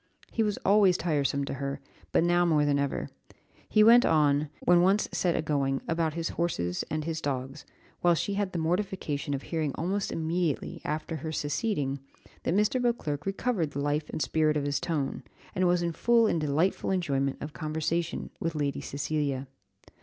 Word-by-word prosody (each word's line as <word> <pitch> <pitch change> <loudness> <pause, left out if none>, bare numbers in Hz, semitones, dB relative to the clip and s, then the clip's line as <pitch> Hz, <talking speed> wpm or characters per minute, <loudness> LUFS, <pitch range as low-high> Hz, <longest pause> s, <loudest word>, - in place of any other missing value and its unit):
He 225 - 0
was 210 -2 +1
always 195 -3 +5
tiresome 140 -4 0
to - - -4
her, 140 0 -3 0.3
but - - +3
now 175 0 +3
more 155 -4 +3
than 145 -1 +2
ever; 140 -1 -1 0.6
he 215 - +5
went 235 +3 +8
on, 150 - +3
when 175 0 +5
once 195 +4 +3
set 175 -2 +1
a - - 0
going, 140 -3 0
about 165 -2 0
his 165 0 -2
horses 90 - -1
and 155 0 -2
his 160 0 -3
dogs, 135 -2 -4 0.3
while 175 -1 +4
she 200 +6 -1
had 200 -1 -1
the 180 - -3
mortification 165 -4 -1
of 135 - -6
hearing 155 -4 -2
almost 195 +5 -1
immediately 165 -1 -2
after 155 +1 -3
her 160 0 -5
seceding, 145 - -1 0.4
that 170 - 0
Mr. 210 +5 +2
Beauclerc 160 -12 -1
recovered 195 - -1
the 140 - -3
life 145 +1 -1
and 155 - -2
spirit 155 +1 +2
of 145 - -1
his 145 -1 0
tone, 150 -5 -2 0.3
and 185 0 +2
was 175 0 +2
in 170 - 0
full 230 +6 +3
and 170 -6 +1
delightful 155 +6 +1
enjoyment 140 -8 0
of 150 +1 -6
conversation 160 +2 -2
with 165 -1 -2
Lady 145 -2 -1
Cecilia. 140 -2 -2
160 Hz, 180 wpm, -28 LUFS, 145-180 Hz, 0.6 s, went